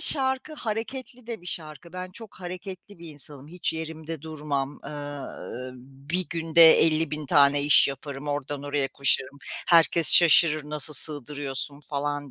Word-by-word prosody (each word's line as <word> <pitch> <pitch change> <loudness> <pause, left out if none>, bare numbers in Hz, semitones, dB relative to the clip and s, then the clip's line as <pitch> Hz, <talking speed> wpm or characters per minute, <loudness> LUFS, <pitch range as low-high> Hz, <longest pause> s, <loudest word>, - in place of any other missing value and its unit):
şarkı 265 +1 -2
hareketli 240 +1 -7
de 230 -4 -7
bir 175 - -15
şarkı. 165 0 -6
Ben 185 0 -8
çok 220 -1 -13
hareketli 185 +1 -10
bir 170 - -11
insanım. 145 -1 +2
Hiç 175 -1 -4
yerimde 160 -1 -8
durmam. 145 -3 -6
Iıı, 145 -3 -9 0.4
bir 180 +1 -2
günde 165 0 +5
50.000 155 -2 -1
tane 140 -2 +3
iş 145 0 +6
yaparım. 140 +1 -8
Oradan 145 0 -5
oraya 145 -1 -3
koşarım. 140 0 +2 0.3
Herkes 165 -3 +6
şaşırır, 155 -2 +6
"Nasıl 150 0 -4
sığdırıyorsun?" 145 -1 -2
falan 145 0 -5
155 Hz, 135 wpm, -24 LUFS, 145-175 Hz, 0.4 s, iş